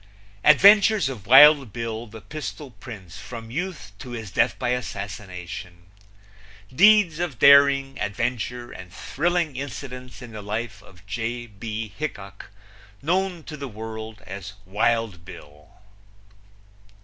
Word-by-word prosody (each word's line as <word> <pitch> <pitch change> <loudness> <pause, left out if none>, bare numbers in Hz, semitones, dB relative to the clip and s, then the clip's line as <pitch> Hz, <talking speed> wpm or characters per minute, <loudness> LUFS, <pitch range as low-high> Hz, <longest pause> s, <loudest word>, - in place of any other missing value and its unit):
Adventures 200 +3 +6
of 110 -7 -8
Wild 140 -1 +8
Bill, 115 +1 -5
the 110 +1 -11
Pistol 150 -1 -7
Prince, 100 -8 -10
from 115 -2 -9
Youth 170 - -5
to 130 - -9
his 110 -5 -7
Death - - +1
by 125 - -2
Assassination. 95 -7 -6 0.9
Deeds 205 -3 +5
of 170 -8 -3
Daring, 140 0 +5
Adventure 120 +3 -3
and 90 -1 -11
Thrilling 165 - -1
Incidents 125 -1 -7
in 120 - -10
the 110 -1 -8
Life 105 0 -5
of 95 -3 -19
J. 115 +4 -4
B. 110 -1 -6
Hickok, 100 -11 -7 0.5
known 180 +1 0
to 155 - -8
the 140 -2 -6
World 110 -1 -8
as 95 +1 -8
Wild 105 -2 0
Bill. 75 -1 -13
120 Hz, 125 wpm, -24 LUFS, 105-140 Hz, 0.9 s, Wild